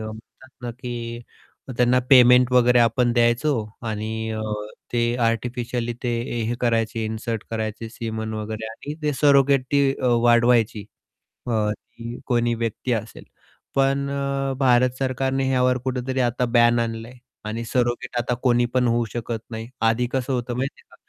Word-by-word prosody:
म्हणतात 110 +4 -10
ना, 120 - -3
की 120 -1 -6 0.6
त्यांना 125 +1 +4
पेमेंट 125 -1 +7
वगैरे 125 0 +5
आपण 120 +1 +3
द्यायचो 120 +5 +2 0.4
आणि 110 +1 -3
अ, 110 0 -3 0.5
ते 120 - +1 0.2
आर्टिफिशियली 120 +1 -1
ते 125 - -1 0.4
हे 120 - 0
करायचे, 115 -2 0
इन्सर्ट 110 0 -3
करायचे 110 0 -4
सीमन 110 -1 -4
वगैरे 110 +1 -5
आणि 145 +6 -7
ते 150 -1 +1
सरोगेटी 140 -1 +4
अ, 130 - 0 0.2
वाढवायची. 120 -3 +3 0.6
अ, 120 - -1 0.2
ती 115 +2 -10
कोणी 120 -1 +2
व्यक्ती 115 +3 -3
असेल. 110 -1 -5 0.5
पण 135 0 +2
अ, 140 -1 -1
भारत 125 -1 +4
सरकारने 135 0 0
ह्यावर 125 -1 +2
कुठेतरी 130 0 -2
आता 125 +1 +1
बॅन 120 0 +5
आणलंय 115 +1 -4 0.3
आणि 115 +2 -3
सरोगेट 120 +1 -1
आता 120 +1 -1
कोणी 120 -1 +3
पण 125 -1 +2
होऊ 120 0 +1
शकत 115 -1 -3
नाही. 115 +1 -6
आधी 115 +2 +2
कसं 130 0 -1
होतं 120 -1 -2
माहिती 135 +2 -3
आहे - - -34
का - - -16
120 Hz, 150 wpm, -23 LUFS, 115-130 Hz, 0.6 s, पेमेंट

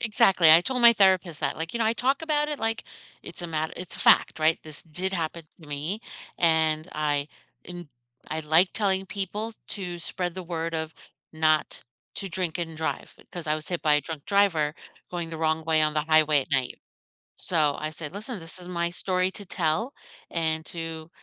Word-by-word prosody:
exactly, 190 -6 +5
I 160 +2 +9
told 250 +6 -1
my 235 0 +10
therapist 190 -6 +3
that, - - -1
like, 165 +1 -4
"You 235 - -3
know, 230 - +1
I 225 - +3
talk 265 +5 0
about 300 -2 +1
it 295 -1 -3
like 225 0 0 0.4
it's - - -10
a - - -2
mat" 160 -1 -2
it's 180 - -7
a - - -11
fact, - - +5
right? 155 +1 +4
This 155 -2 -12
did 180 +4 -3
happen 165 -2 -3 0.2
to 150 - -12
me, 150 +9 -3 0.4
and 160 -1 +2
I 145 -1 0 0.4
am 175 -2 -8 0.4
I 155 +1 -2
like 160 +4 +4
telling 195 -3 +1
people 205 +3 -3 0.2
to 180 -4 -5
spread 175 0 -4
the 185 - -5
word 165 -1 -4
of 160 0 -3 0.4
not 155 -1 +1 0.4
to 195 - -4
drink 180 -2 -2
and 165 -2 -4
drive 160 - -4 0.2
'cause 175 -2 -7
I 155 - +2
was 155 0 -6
hit 175 -2 -3
by 150 -2 +4
a 150 - +3
drunk 150 0 -7
driver 170 -7 +2 0.4
going 170 -2 -3
the 165 - -6
wrong 160 0 +1
way 160 -1 +3
on 155 0 +2
the 150 - +1
highway 155 -1 +4
at 135 - -8
night. 130 -3 0 0.6
So, 155 -5 +1
I 155 0 -3
said, 155 -1 -7
"Listen, 215 +2 -6
this 165 +2 -12
is 180 - -11
my 170 -1 -1
story 185 +1 0
to 205 - -9
tell, 180 - -1 0.4
and 160 -1 -1
to 165 -1 -6
165 Hz, 205 wpm, -26 LUFS, 155-190 Hz, 0.6 s, my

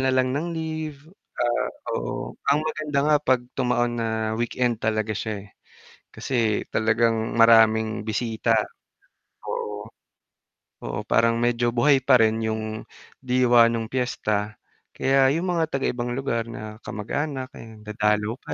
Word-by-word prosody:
nalang 130 -1 +2
ng 150 +5 -2
leave, 155 -2 -5 0.3
ah, 120 0 0 0.2
oo, - - -4 0.2
ang 150 +2 +3
maganda 155 -2 -2
nga 150 0 +4
'pag 130 -4 +1
tumaon 120 -2 0
na 115 - -1 0.2
weekend 120 0 -1
talaga 110 0 0
siya 105 -1 -4
eh, 105 - -16 0.6
kasi 115 -5 0
talagang 110 +1 +1
maraming 110 -1 +5
bisita, 115 +1 -1 0.9
oo. 105 +1 -5 0.9
Oo, - - -3
parang 115 +1 +3
medyo 120 0 +1
buhay 135 +1 +3
pa 130 -4 +6
rin 110 0 +2
yung 110 0 -3 0.3
diwa 125 -2 +4
nung 115 -1 -1
piyesta, 110 -4 -1 0.4
kaya 135 0 +3
yung 175 +3 -1
mga 160 -2 -1
taga 135 - 0
ibang 120 0 -3
lugar 120 -3 -2
na 110 -2 -8
kamag-anak 130 +5 -3
eh, 110 -1 -12
dadalaw 105 +2 0
pa - - -7
115 Hz, 135 wpm, -24 LUFS, 110-130 Hz, 0.9 s, pa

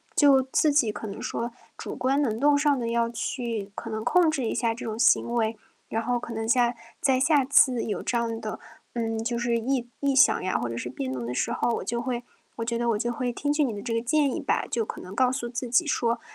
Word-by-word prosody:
就 275 -3 +6
自 290 +3 +2
己 245 -7 +2
可 210 - -7
能 200 - -7
说 235 +1 -3 0.3
主 - - -6
观 270 +3 +1
能 225 -5 0
动 290 0 +4
上 285 -2 +2
的 235 - -2
要 230 0 +1
去， 230 -3 -3
可 230 - -6
能 220 0 -3
控 350 -3 +4
制 275 -6 -2
一 - - -1
下 230 -1 +1
这 230 - -8
种 220 -1 -4
行 235 0 +3
为。 225 -1 0 0.3
然 225 - -1
后 245 +1 0
可 235 -1 -6
能 225 0 -3
下 240 0 +3 0.3
再 265 -2 +3
下 285 0 +4
次 255 -2 +4
有 210 - -3
这 240 - -1
样 230 -1 -2
的， 215 -1 -6 0.3
嗯， 225 -1 -2
就 235 +1 -2
是 235 0 +1
异 240 +1 -1
异 280 -1 +1
响 275 - +5
呀， 185 - 0
或 120 -1 -2
者 115 - -4
是 120 - -4
辩 130 0 -4
论 125 -2 -4
的 125 - -3
时 - - -1
候， - - 0
我 - - -2
就 235 0 -2
会 240 -1 -3 0.3
我 230 - -3
觉 235 0 -1
得 240 - -1
我 210 - +1
就 240 +2 -1
会 245 0 -2
听 290 +3 -1
取 295 0 +2
你 240 - -2
的 205 - -6
这 230 +2 -3
个 230 - +1
建 280 +2 +2
议 - - -2
吧， - - 0
就 230 -2 0
可 - - -7
能 185 +2 -9
告 255 +3 +3
诉 255 -2 -3
自 235 0 -4
己 330 +7 +3
说， 235 -5 0
235 Hz, 285 characters per minute, -26 LUFS, 225-265 Hz, 0.3 s, 就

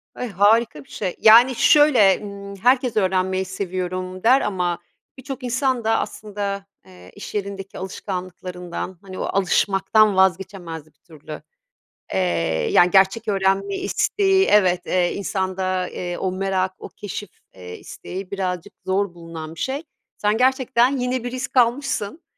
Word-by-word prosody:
Ay, 250 - -4
harika 205 -5 +2
bir - - -27
şey. 185 -4 -4
Yani, 235 +3 +7
şöyle, 250 -12 +5
ımm, 200 -1 -8
herkes 245 +1 +2
öğrenmeyi 190 -1 +1
seviyorum 185 0 -4
der 255 +4 +5
ama 180 -4 -1 0.4
birçok 260 0 -7
insan 250 0 0
da 225 0 +2
aslında, 200 -1 -4 0.2
eee, 90 0 -16
iş - - -9
yerindeki 195 -1 -5
alışkanlıklarından, 180 -2 -6
hani, 190 -1 -9
o - - -2
alışmaktan 195 +2 +2
vazgeçemez 185 -4 0
bir 155 - -24
türlü. 155 -2 -12 0.7
Eee, 95 - +1 0.5
yani, 175 0 +5
gerçek 195 +4 +3
öğrenme 195 0 +1
isteği, 385 - +1
evet, 185 -4 +3
eee, 180 -1 +1
insanda, 185 -2 -2
eee, 175 -1 -5
o 190 -1 -2
merak, 190 0 -1
o - - -9
keşif, 205 0 -7 0.2
eee, 90 -1 -10
isteği 190 +1 -8
birazcık 185 -1 -3
zor 190 -1 0
bulunan 165 -2 -9
bir - - -12
şey. 275 +4 -2 0.3
Sen 210 +1 +1
gerçekten 260 0 +2
yeni 250 -1 -2
bir 245 - -4
risk 255 +1 -5
almışsın 245 - +1
195 Hz, 140 wpm, -22 LUFS, 185-225 Hz, 0.7 s, Yani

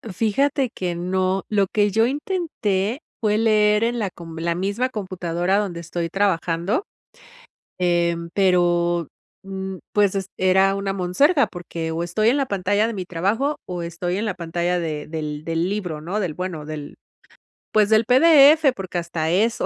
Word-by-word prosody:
Fíjate 265 - +1
que 180 -5 -4
no, 185 +2 -1
lo 200 -2 +2
que 205 +1 +1
yo 225 +3 +3
intenté 265 - -2 0.2
fue 210 -1 +1
leer 215 -1 +3
en 240 +1 0
la 205 -3 -1
com 165 -2 -10
en 165 - -4
la 170 0 +1
misma 200 +8 -1
computadora 185 -4 -1
donde 185 -5 -2
estoy 170 0 -3
trabajando, 185 - 0 0.9
eh, 175 -1 +2 0.2
pero, 175 -3 +2 0.4
mm, 190 0 -5 0.2
pues, 205 -2 +3
es 195 -2 -2
era 190 +1 +3
una 195 0 -2
monserga, 235 - +2
porque, 170 -2 -6
o 165 +1 -2
estoy 195 +6 +1
en 250 - +3
la 280 - +1
pantalla 205 +1 +1
de 230 - -3
mi 190 -4 -5
trabajo, 205 - 0
o 180 -1 -5
estoy 175 +2 -3
en 220 - -2
la 205 - -2
pantalla 175 +1 -1
de 155 -3 -4
del 150 -2 -5
del 165 +2 -1
libro, 180 -7 -4
no, 185 +7 -2
del 175 -6 -2
bueno 175 -4 -5
del 150 -2 -7 0.8
pues, 210 -1 +4
del 220 +1 +4
PDF. 295 +2 +6
Porque 185 -5 -5
hasta 170 -2 -2
eso, 215 +7 +1
190 Hz, 170 wpm, -22 LUFS, 170-215 Hz, 0.9 s, PDF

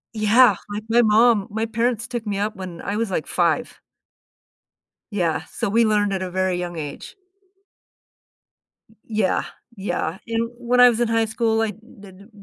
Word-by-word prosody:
Yeah. 215 +1 +5 0.2
Like, 210 +1 -4
my 235 +1 +5
mom 220 -1 +4
my 220 +2 -2
parents 230 0 -1
took 240 -3 -5
me 200 -1 -2
up 210 +2 -2
when 185 -3 -8
I 200 - -3
was, 230 -1 -1
like, 180 -4 -2
5. 175 +7 0 1.3
Yeah. 175 -5 0
So - - -2
we 230 +3 +3
learned 210 -2 +2
at 190 -1 -2
a 185 - -5
very 185 0 0
young 175 -1 -4
age. 150 -3 -7 1.8
Y 220 - -23
yeah, 215 -4 0 0.3
yeah. 190 -3 -3
And 230 0 -1
when 245 +1 0
I 250 0 +9
was 235 -1 -1
in 240 - +2
high 225 0 +2
school, 225 0 0
I 220 -1 0
did 200 -3 -16
w 200 +3 -16
215 Hz, 175 wpm, -22 LUFS, 190-230 Hz, 1.8 s, I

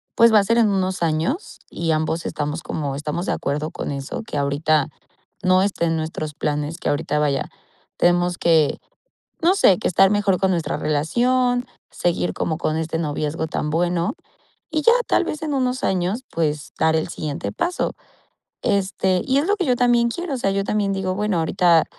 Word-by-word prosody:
pues, 230 -1 +6
va 215 - +8
a - - +2
ser 230 +3 +2
en 225 -2 +4
unos 190 -2 -1
años 165 - -1
y 165 -1 -2
ambos 160 +1 -1
estamos 150 +2 -3
como 145 -3 -3
estamos 150 +5 -3
de - - +1
acuerdo 150 +3 -2
con - - -5
eso, 140 +6 -5
que - - -4
ahorita 145 +1 +1 0.5
no 185 0 +4
esté 195 -4 0
en 165 0 +1
nuestros 155 -1 -4
planes, 150 +2 -2
que - - -2
ahorita, 150 +1 -1
vaya, 145 -2 0 0.5
tenemos 175 0 +2
que, 160 -3 +3 0.6
no 360 +3 +5
sé, 195 - +5
que - - 0
estar 190 +2 +5
mejor 205 -2 +2
con 190 -1 +2
nuestra 170 -3 -1
relación, 245 - +1 0.3
seguir 175 0 -1
como 160 - -2
con 155 -1 -1
este 160 0 -2
noviazgo 150 0 -2
tan 155 -1 -2
bueno 175 +5 0 0.6
y 310 - 0
ya, 465 - +6 0.2
tal - - +3
vez 305 - -5
en 305 -2 -2
unos 255 -1 0
años, 190 +6 0
pues, 150 -3 -2
dar 160 0 +3
el 160 - -1
siguiente 145 -9 -4
paso, 360 +1 -1 0.7
este, 190 -3 +1
y 265 - +2
es 290 - +1
lo 415 - +3
que 370 - -1
yo 250 -2 +2
también 240 -1 +3
quiero, 345 +3 -4
o - - -3
sea, 195 -5 0
yo 195 0 0
también 205 -1 0
digo, 190 -1 -1
bueno, 205 -2 0
ahorita 170 0 +3
175 Hz, 190 wpm, -22 LUFS, 155-210 Hz, 0.7 s, va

